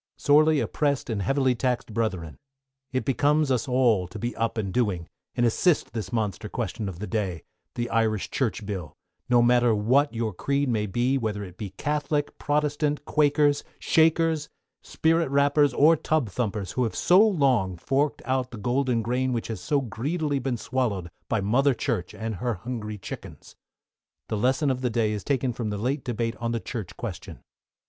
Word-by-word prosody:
Sorely 155 +1 +4
oppressed 140 -5 -1
and 105 -3 -1
heavily 135 +4 +2
taxed 125 -2 -2
Brethren: 95 -8 -2 0.5
It 130 0 -1
becomes 145 +2 +2
us 125 -1 0
all 120 -8 +3
to 90 - -9
be 120 +1 -3
up 115 +1 -1
and 100 -4 -2
doing, 100 -9 0 0.3
and 120 - +2
assist 145 +4 +2
this 110 -1 -4
monster 105 -6 -2
question 110 -4 -3
of 90 - -8
the 105 - -5
day 100 -7 -2 0.3
the 120 0 -2
Irish 110 -3 0
Church 115 -5 -1
Bill 95 -5 -5 0.3
no 120 -1 +5
matter 120 -1 +4
what 130 +8 +3
your 115 -2 -2
creed 140 +8 0
may 105 -3 0
be, 125 +7 +1
whether 105 -3 -2
it 90 -3 -10
be 100 +1 -6
Catholic, 150 0 -1
Protestant, 150 0 0
Quakers, 145 -1 +3
Shakers, 160 -1 +2 0.3
Spirit 165 -1 +1
Rappers, 140 +1 +3
or 150 +6 +5
Tub 155 -5 0
Thumpers, 100 -3 -2
who 125 - 0
have 115 - -2
so 180 +3 +5
long 135 - +3
forked 140 - 0
out 130 -1 0
the 120 - -9
golden 120 +1 0
grain 125 +3 0
which 115 -1 -3
has 110 -5 -4
so 145 +8 +1
greedily 145 +5 -2
been 130 -2 -2
swallowed 110 -8 -2 0.2
by 110 - +1
Mother 130 +7 +3
Church 115 -9 -2
and 110 -2 -4
her 120 +3 -1
hungry 110 0 -5
chickens. 95 - -9 0.7
The 110 - -1
lesson 130 +6 +2
for 130 -1 -1
the 125 - +1
Day 110 -2 +1
is 105 -3 -3
taken 130 -1 0
from 115 -2 -3
the 105 - -3
late 130 +6 -1
debate 115 -1 -2
on 115 - -6
on 115 - 0
the 115 - -1
Church 110 -5 -6
Question. - - -7
125 Hz, 180 wpm, -26 LUFS, 110-140 Hz, 0.7 s, no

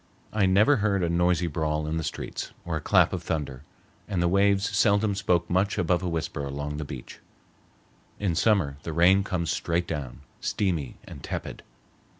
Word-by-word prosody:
I 105 -3 +3
never 105 +9 +5
heard 100 -3 +1
a 85 - +1
noisy 90 0 +2
brawl 75 -1 -1
in 80 +1 -2
the 80 - -2
streets, 75 - -5
or - - -2
a - - -2
clap - - +4
of - - -2
thunder, 70 -5 -3 0.5
and 95 -4 -2
the 85 - +2
waves 100 +2 +3
seldom 100 0 +3
spoke 90 -3 +1
much 95 +4 +1
above 90 0 +1
a 90 - -2
whisper 80 -3 -3
along 75 +1 -4
the 75 - -3
beach. 65 -3 -9 1.0
In 100 -4 0
summer 80 -6 +2
the 80 - -5
rain 90 +4 +5
comes 90 -4 -2
straight 85 +1 -1
down, 70 -5 -5 0.2
steamy 85 -10 -1
and - - -11
tepid. - - -5
85 Hz, 175 wpm, -26 LUFS, 75-100 Hz, 1.0 s, never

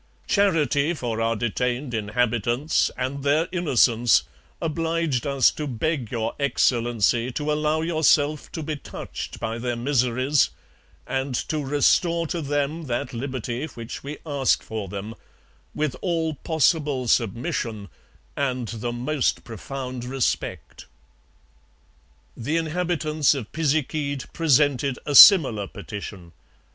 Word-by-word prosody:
Charity 165 -5 +2
for 115 -5 -3
our 115 0 +1
detained 125 +3 -2
inhabitants, 120 +5 0
and 130 +2 -3
their 150 +4 +2
innocence, 120 -9 +3 0.4
obliged 165 -4 -1
us 140 -3 +4
to 150 - -5
beg 130 -1 -2
Your 115 -2 -2
Excellency, 120 -3 +1
to 150 +2 -2
allow 150 +1 +1
yourself 155 -2 +2
to 160 - -4
be 155 0 -3
touched - - -7
by 115 +1 -3
their 120 0 -2
miseries, 130 +2 +1 0.6
and 135 -1 -2
to 155 - -1
restore 165 +5 +2
to 165 +1 -3
them 145 +2 -2
that 120 0 -3
liberty 130 +2 -4
which 115 -5 -8
we 145 +2 -6
ask 140 -5 +1
for 110 -3 -5
them, 100 +3 -6 0.6
with 150 -2 -1
all 165 -3 0
possible 150 -3 0
submission 115 - -1 0.5
and 130 -5 -2
the 120 +1 -4
most 125 +4 -1
profound 125 +2 -6
respect. 130 0 -3 1.5
The 145 +8 -2
inhabitants 160 -3 +1
of 125 -6 -6
Pisiquid 145 -2 -1
presented 145 -4 +2
a 145 - -2
similar 135 - +8
petition. 100 -4 -8
135 Hz, 115 wpm, -24 LUFS, 120-155 Hz, 1.5 s, similar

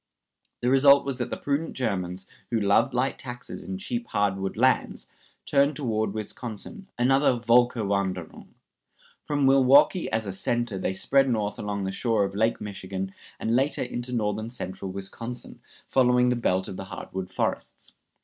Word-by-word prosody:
The 125 - +1
result 140 +1 +6
was 135 -2 -2
that 120 0 -2
the - - -4
prudent 145 +3 -2
Germans, 95 -6 -2 0.2
who 115 - +1
loved 100 +6 +3
light 130 +2 0
taxes 120 -1 -7
and 190 - -5
cheap 235 +3 -4
hard 100 -2 +1
wood 95 0 -4
lands, - - +1 0.4
turned 140 +1 +3
toward 110 -6 -1
Wisconsin, 120 - -6
another 135 +3 +4
Völkerwanderung. 100 -7 +1 0.8
From 145 -2 +1
Milwaukee 135 +6 +5
as 110 0 0
a 100 - -3
center 120 +1 -1
they 95 - -2
spread 135 +6 +2
north 105 -3 -1
along 100 -1 -3
the 95 - -2
shore 110 0 +1
of 100 - -2
Lake 110 +3 +1
Michigan, 95 -2 -5 0.3
and 115 - 0
later 135 +3 +1
into 125 0 -5
northern 110 -1 -1
central 95 -5 -6
Wisconsin, 115 +6 -7 0.3
following 125 -1 +4
the 125 - +2
belt 95 -6 0
of 95 - -7
the 95 - -6
hardwood 95 0 -6
forests. - - -3
115 Hz, 160 wpm, -26 LUFS, 100-130 Hz, 0.8 s, result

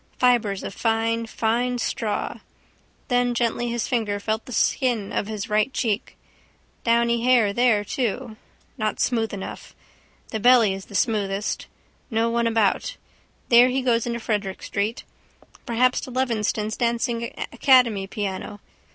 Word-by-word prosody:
Fibres 230 -6 +2
of - - -5
fine 230 +1 0
fine 240 +3 0
straw. 215 -3 -2 0.7
Then 245 -1 +1
gently 240 0 0
his 235 -1 -2
finger 215 -4 -1
felt 220 +2 -2
the - - -8
skin 235 -3 0
of 205 - -1
his 215 -2 -4
right 215 +4 +1
cheek. 225 -5 -2 0.7
Downy 235 0 +2
hair 240 -5 +4
there 225 -3 +3
too. 225 -2 -3 0.4
Not 215 0 -1
smooth 225 -3 +1
enough. 195 -1 -8 0.5
The 220 - -3
belly 235 -3 +5
is 195 0 -7
the 200 - -11
smoothest. 205 -2 -1 0.4
No 230 -1 +1
one 235 0 +1
about. 225 - +1 0.5
There 240 +1 +7
he 260 +1 -1
goes 235 -2 +1
into 235 0 -2
Frederick 210 -4 -3
street. 210 +4 -2 0.6
Perhaps 245 +2 +2
to - - -7
Levenston's 220 -4 -1
dancing 235 0 0 0.3
academy 235 -7 +4
piano. 205 0 -4
230 Hz, 135 wpm, -24 LUFS, 210-240 Hz, 0.7 s, There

